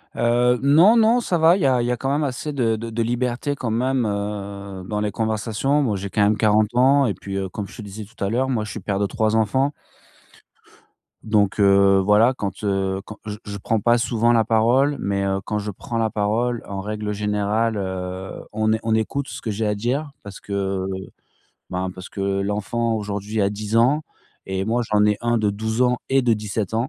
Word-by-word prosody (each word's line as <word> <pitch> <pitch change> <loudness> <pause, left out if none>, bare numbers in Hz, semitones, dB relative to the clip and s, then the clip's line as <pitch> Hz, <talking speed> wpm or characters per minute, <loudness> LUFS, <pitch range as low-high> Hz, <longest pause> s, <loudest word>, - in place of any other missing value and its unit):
Heu, 120 +1 +3
non, 165 +11 +6
non, 230 +2 +4
ça 180 -6 0
va, 165 +3 +5
il 195 - -4
y - - +2
a 130 -2 +3
il - - -1
y 120 - 0
a 125 - -1
quand 135 - -2
même 150 +2 +1
assez 145 +2 -3
de 115 -5 +1
de 115 +1 -6
de 115 +1 -2
liberté 120 +4 -1
quand 125 -4 -4
même, 125 +1 +1
heu, 100 -2 -4
dans 105 -1 -2
les 105 -1 -1
conversations. 110 +6 0
Moi, 110 -6 0
j'ai 100 +1 -5
quand 105 - 0
même 105 +1 +3
40 110 0 +2
ans 135 +2 +5
et 105 - 0
puis, 95 +2 -7
heu, 95 -1 -3
comme 100 +1 -5
je - - -14
te 115 - -7
disais 105 +1 -8
tout 110 -1 -9
à 100 - 0
l'heure, 130 +4 0
moi 115 -4 0
je 105 - -6
suis - - -6
père 100 -1 -2
de 100 - +2
3 110 +2 0
enfants. 130 +6 +2 1.5
Donc 105 -2 +1
heu, 100 -1 +5
voilà, 105 +6 +4
quand, 100 +1 -5
heu, 95 -1 0
quand 110 +1 -10
je 105 -1 -5
je 100 -1 -5
prends 110 +3 0
pas 120 +3 +3
souvent 120 0 +1
la 115 -1 +4
parole, 120 +6 +2
mais 100 0 -1
heu, 95 0 -1
quand 105 - -2
je 105 0 -3
prends 115 +4 -6
la 110 -1 +1
parole 115 +3 0
en 100 -1 -5
règle 105 +1 -4
générale, 105 +2 0
heu, 95 -1 -5
on 110 +1 0
é 110 - +1
on 110 -1 0
écoute 130 +5 -1
ce - - -7
que 110 - -4
j'ai 110 +2 -2
à 105 - +1
dire 130 +8 -2
parce 100 -1 -10
que, 95 -1 -2 0.8
ben, 95 0 -3
parce 95 -1 -9
que - - -7 0.2
l'enfant, 105 +4 -1
aujourd'hui, 105 0 -3
a 100 - +2
10 105 +2 -3
ans 130 +7 +4 0.4
et 95 0 -2
moi, 115 +4 0
j'en 105 -1 +4
ai 105 -1 +2
1 120 0 +1
de 105 -2 +1
12 110 +3 -1
ans 125 -1 +2
et 135 0 +3
de 120 -2 +3
17 105 -1 -2
ans, 115 +3 0
110 Hz, 230 wpm, -22 LUFS, 100-120 Hz, 1.5 s, non